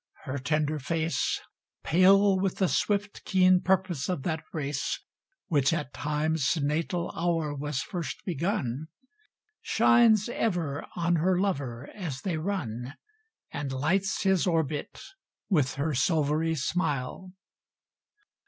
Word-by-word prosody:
Her 135 +2 -4
tender 150 +3 0
face, 160 +4 -1 0.4
Pale 195 +3 +5
with 190 -1 0
the 190 - +2
swift, 205 +2 -1
keen 185 -1 +4
purpose 185 -5 0
of 180 -7 -2
that 160 0 -2
race 140 -2 -2 0.5
Which 140 -4 +2
at 150 -5 -3
Time's 150 -1 0
natal 165 +4 -1
hour 165 -3 0
was 145 -2 -3
first 165 -8 -4
begun, 160 - -2 0.7
Shines 225 -4 +4
ever 175 -12 -2
on 170 0 +1
her 180 +3 +2
lover 140 -10 -2
as 160 -10 -5
they 175 -2 -2
run 145 - -3 0.6
And 145 -2 -4
lights 180 +10 0
his 190 -2 +3
orbit 160 -4 -1 0.5
with 150 -10 +2
her 150 +3 -1
silvery 155 +3 +1
smile. 155 +3 -2
160 Hz, 115 wpm, -28 LUFS, 145-185 Hz, 0.7 s, Pale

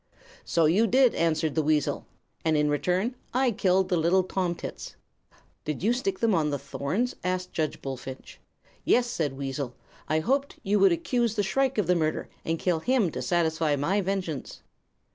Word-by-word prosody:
"'So 165 -2 +2
you 195 +9 +4
did,' 255 +2 +4
answered 160 -2 +1
the 160 - +2
weasel; 150 -1 0 0.4
'and 160 -1 +2
in 150 0 +2
return 180 - 0 0.2
I 255 -1 +3
killed 190 -2 +2
the 180 - +2
little 175 +4 +3
tomtits.' 180 -2 -4 0.7
"'Did 150 +2 -4
you 225 +4 +3
stick 195 -6 -1
them 230 -2 +3
on 155 -4 +2
the 145 - -1
thorns?' 165 - -2
asked 185 0 -2
Judge 155 -2 -2
Bullfinch. 130 -1 -7 0.4
"'Yes,' 245 - +3
said 160 - -2
the - - -11
weasel. 135 -2 -4 0.3
'I 155 0 +2
hoped 275 - 0
you 205 +1 +2
would 195 -1 +6
accuse 235 +6 0
the 205 - +1
shrike 265 +6 0
of 210 - +2
the 180 - +3
murder, 155 -3 -1
and 165 0 -1
kill 175 -1 0
him 230 -2 +1
to - - -4
satisfy 160 -3 +1
my 170 +9 +1
vengeance.' 185 -7 -4
175 Hz, 180 wpm, -27 LUFS, 155-205 Hz, 0.7 s, would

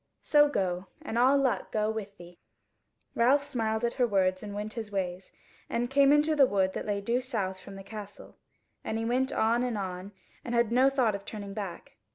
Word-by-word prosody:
So 295 -1 +5
go, 185 -6 -2 0.2
and - - -5
all 255 +4 +5
luck 270 -3 0
go 215 0 0
with 205 -2 -6
thee." 175 0 -14 0.7
Ralph 265 +5 +3
smiled 225 -5 -1
at 235 - -1
her 250 -2 +2
words 185 -3 +1
and 205 -1 -7
went 210 +1 -4
his 220 -3 -6
ways, 185 -2 -3 0.4
and 240 +2 -1
came 280 0 +5
into 300 +1 +4
the 275 -3 +6
wood 190 -3 +1
that - - -5
lay 200 -1 -1
due 235 +5 0
south 200 -7 -3
from 195 +1 -11
the 195 - -9
Castle, 205 0 -10 0.5
and 220 - -3
he 225 - -2
went 255 +3 +1
on 230 +2 +2
and 245 -3 -1
on 185 0 -5 0.3
and 240 - -3
had 235 -1 +2
no 255 +3 +5
thought 255 -5 +1
of 200 0 -5
turning 200 -1 -7
back. 195 -4 -7
220 Hz, 210 wpm, -29 LUFS, 195-250 Hz, 0.7 s, the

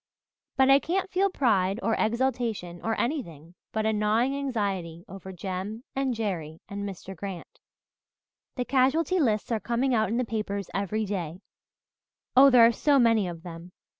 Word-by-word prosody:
But 265 0 +5
I 275 - +7
can't 375 +5 -2
feel 385 +1 +2
pride 205 - +1
or 225 - +1
exultation 225 -7 -1
or 225 0 -2
anything 170 - -3 0.2
but 220 0 -1
a 220 - +2
gnawing 220 +5 +1
anxiety 200 -11 -3
over 190 +1 -9
Jem 190 +5 -5
and 265 -2 0
Jerry 170 -8 -4
and 200 0 -5
Mr. 190 0 -9
Grant. 200 - -8 1.0
The 250 - -2
casualty 275 +8 +2
lists 220 -6 0
are 225 - +1
coming 245 +4 0
out 220 -2 +2
in 230 - -1
the 250 - 0
papers 205 -3 -4
every 210 +2 -1
day 180 -3 -4 0.9
oh, 275 +2 +8
there 245 -3 +7
are 230 - +5
so 285 +4 +2
many 230 -6 +3
of 170 -1 -7
them. 175 0 -10
220 Hz, 165 wpm, -27 LUFS, 190-255 Hz, 1.0 s, oh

